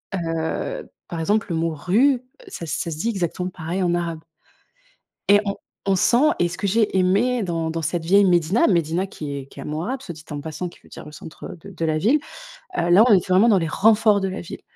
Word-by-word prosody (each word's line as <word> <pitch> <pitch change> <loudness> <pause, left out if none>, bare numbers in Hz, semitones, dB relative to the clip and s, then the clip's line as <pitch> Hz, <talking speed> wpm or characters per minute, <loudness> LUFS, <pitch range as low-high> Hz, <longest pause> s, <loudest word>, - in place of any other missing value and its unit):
heu, 165 - -3 0.2
par 170 - -5
exemple, 205 +7 +1
le 165 - -1
mot 165 0 0
rue, 235 - +2 0.3
ça 170 - -7
ça 165 +2 -3
se 155 - -5
dit 225 +8 -1
exactement 180 -3 -2
pareil 175 +2 -4
en 175 -1 +1
arabe 170 -2 -3 1.1
et 205 0 +7
on 200 - -2 0.3
on 195 -1 +2
sent 245 +10 +4
et 175 - +2
ce 180 - -7
que 200 - -2
j'ai 215 -1 +1
aimé 205 +6 +2
dans 165 -3 -2
dans 165 0 -3
cette 165 +1 -2
vieille 200 +4 +5
médina, 175 +4 +3
médina 170 +1 +1
qui 145 -7 -6
est 135 - -7
qui - - -16
est - - -6
un - - -7
mot 155 +2 -3
arabe, 255 +7 -3
soit 185 -10 -7
dit 155 - -13
en 145 - -4
passant 160 +4 -5
qui - - -16
veut - - -20
dire - - -10
le 150 - -10
centre 160 +3 -10
de 200 - -11
de 170 -3 -4
la 155 -1 +1
ville, 250 - +3 0.6
heu, 170 - 0
là, 195 +6 +7
on 220 - +7
était 185 0 +1
vraiment 200 +6 +5
dans 205 - +5
les 165 -2 -1
renforts 215 +1 +4
de 195 - -1
la 190 - -5
ville. 170 - -9
180 Hz, 245 wpm, -22 LUFS, 165-205 Hz, 1.1 s, et